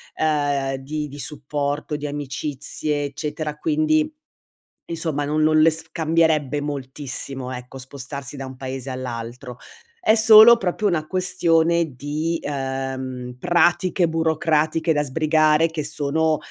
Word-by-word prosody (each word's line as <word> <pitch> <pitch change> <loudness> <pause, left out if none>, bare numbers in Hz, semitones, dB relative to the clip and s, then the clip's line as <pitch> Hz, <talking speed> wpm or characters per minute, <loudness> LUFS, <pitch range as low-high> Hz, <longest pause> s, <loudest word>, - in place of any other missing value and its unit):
ehm, 145 -3 0
di 150 +3 -4
di 145 0 -11
supporto, 145 +2 -3
di 150 - -6
amicizie, 145 +1 -3
eccetera, 150 +1 -5
quindi, 310 - +1 0.7
insomma, 160 -3 -2
non 150 +2 0
non 155 0 +4
le 165 - +7
s 160 +1 -6
cambierebbe 155 -4 +1
moltissimo, 135 -2 -6
ecco, 125 +1 -8
spostarsi 135 +1 -7
da 135 - -5
un 130 0 -9
paese 130 0 -6
all'altro. 125 0 -6 0.4
È 220 - +4
solo 220 +1 +9
proprio 195 0 -1
una 155 -4 -1
questione 170 -3 +1
di, 155 +5 -2
ehm, 130 -2 -4
pratiche 175 +2 +2
burocratiche 160 0 +1
da 150 - +1
sbrigare 155 +2 +3
che 160 -2 -4
sono, 155 +1 0
150 Hz, 125 wpm, -22 LUFS, 135-160 Hz, 0.7 s, solo